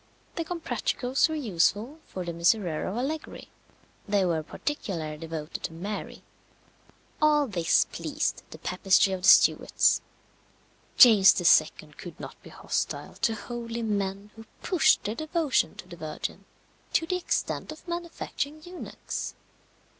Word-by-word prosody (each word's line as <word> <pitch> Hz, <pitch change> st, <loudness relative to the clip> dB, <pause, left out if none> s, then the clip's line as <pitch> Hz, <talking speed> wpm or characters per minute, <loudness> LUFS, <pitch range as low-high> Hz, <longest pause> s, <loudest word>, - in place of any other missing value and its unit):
The 335 Hz, -, -2 dB
Comprachicos 320 Hz, -5 st, -1 dB
were 315 Hz, -, -2 dB
useful 220 Hz, -, 0 dB
for 185 Hz, -1 st, -6 dB
the 170 Hz, -, -4 dB
Miserere 170 Hz, -1 st, +1 dB
of 195 Hz, -, -4 dB
Allegri. 295 Hz, +5 st, -4 dB, 0.6 s
They 200 Hz, -2 st, +2 dB
were 165 Hz, -3 st, 0 dB
particularly 160 Hz, -, -4 dB
devoted 160 Hz, -1 st, -6 dB
to -, -, -6 dB
Mary. 200 Hz, +6 st, -6 dB, 1.0 s
All 300 Hz, -1 st, +4 dB
this 175 Hz, -9 st, +2 dB
pleased -, -, -3 dB
the -, -, -10 dB
papistry 190 Hz, +1 st, +2 dB
of 185 Hz, -, -4 dB
the 185 Hz, -, +1 dB
Stuarts. -, -, +5 dB, 1.0 s
James 215 Hz, -6 st, +8 dB
II. -, -, +3 dB
could -, -, -10 dB
not -, -, -9 dB
be -, -, -13 dB
hostile -, -, -3 dB
to 225 Hz, -, +2 dB
holy 235 Hz, +1 st, -5 dB
men 200 Hz, -1 st, -2 dB
who 225 Hz, 0 st, -12 dB, 0.2 s
pushed 335 Hz, -4 st, +3 dB
their 210 Hz, -, -2 dB
devotion 310 Hz, +1 st, 0 dB
to -, -, -11 dB
the 175 Hz, -1 st, -11 dB
Virgin 155 Hz, -1 st, -6 dB, 0.5 s
to 325 Hz, -, +2 dB
the 365 Hz, +2 st, -1 dB
extent 355 Hz, -, -2 dB
of 310 Hz, +3 st, -12 dB
manufacturing 335 Hz, -3 st, -5 dB
eunuchs. 355 Hz, +1 st, -6 dB
220 Hz, 135 wpm, -27 LUFS, 180-305 Hz, 1.0 s, James